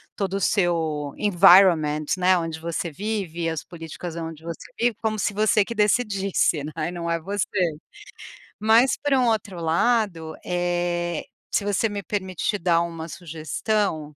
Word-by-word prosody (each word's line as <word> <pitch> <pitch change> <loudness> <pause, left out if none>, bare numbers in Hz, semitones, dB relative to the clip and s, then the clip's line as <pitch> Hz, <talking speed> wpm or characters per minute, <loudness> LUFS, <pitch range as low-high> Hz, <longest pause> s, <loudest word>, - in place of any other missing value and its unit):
todo 195 -1 -2
o - - 0
seu 160 -7 0
environment, 175 -6 +5
né, 185 0 +4
onde 165 -1 -4
você 170 +1 -3
vive 190 -1 -4
e 165 - +1
as 160 -2 -4
políticas 165 0 -8
onde 160 -1 -6
você 170 -1 -7
vive, 235 -2 +2
como 215 -1 -1
se 210 - 0
você 215 0 +3
que 235 - -6
decidisse, 200 - +1
né, 155 - -5 0.2
e - - -4
não 170 -1 -4
é 165 - 0
você. 200 +4 -2 1.1
Mas 225 +5 +4
por 290 -1 +1
um 255 -2 +3
outro 205 -5 -1
lado, 170 -1 0
eh, 175 -1 -1 0.3
se 205 - 0
você 205 +2 +1
me 205 -1 -4
permitir 190 +1 -2
dar 170 -1 +2
uma 165 -1 -5
sugestão 160 0 -2
175 Hz, 155 wpm, -24 LUFS, 165-205 Hz, 1.1 s, environment